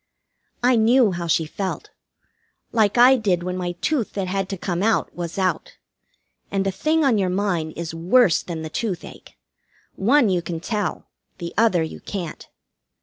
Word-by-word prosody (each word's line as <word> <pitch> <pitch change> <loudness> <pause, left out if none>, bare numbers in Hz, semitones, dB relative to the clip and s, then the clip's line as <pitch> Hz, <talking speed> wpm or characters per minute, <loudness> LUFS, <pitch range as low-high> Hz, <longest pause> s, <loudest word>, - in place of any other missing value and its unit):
I 250 0 +4
knew 230 0 +4
how 175 -1 -4
she 165 0 +2
felt. 190 +5 -5 0.8
Like 220 -1 +2
I 255 +2 +7
did 190 -7 0
when 180 0 -3
my 180 -1 -3
tooth 235 - -1
that 195 -2 -2
had 195 0 -2
to 195 - -4
come 175 0 -3
out 225 +2 +1
was 170 0 -5
out. 185 -4 -1 0.7
And 195 0 -1
a 195 - +1
thing 310 +9 +1
on 235 -6 +3
your 190 -2 +1
mind 180 -5 -1
is 170 -1 -5
worse 180 +4 +3
than 165 -3 -6
the 160 - -5
toothache. 190 -4 -5 0.6
One 245 +5 +3
you 180 -3 +1
can 170 -1 -5
tell, 205 +2 -3 0.3
the 170 -2 -6
other 205 -7 +3
you 160 - -6
can't. 180 -6 -6
190 Hz, 170 wpm, -22 LUFS, 175-225 Hz, 0.8 s, I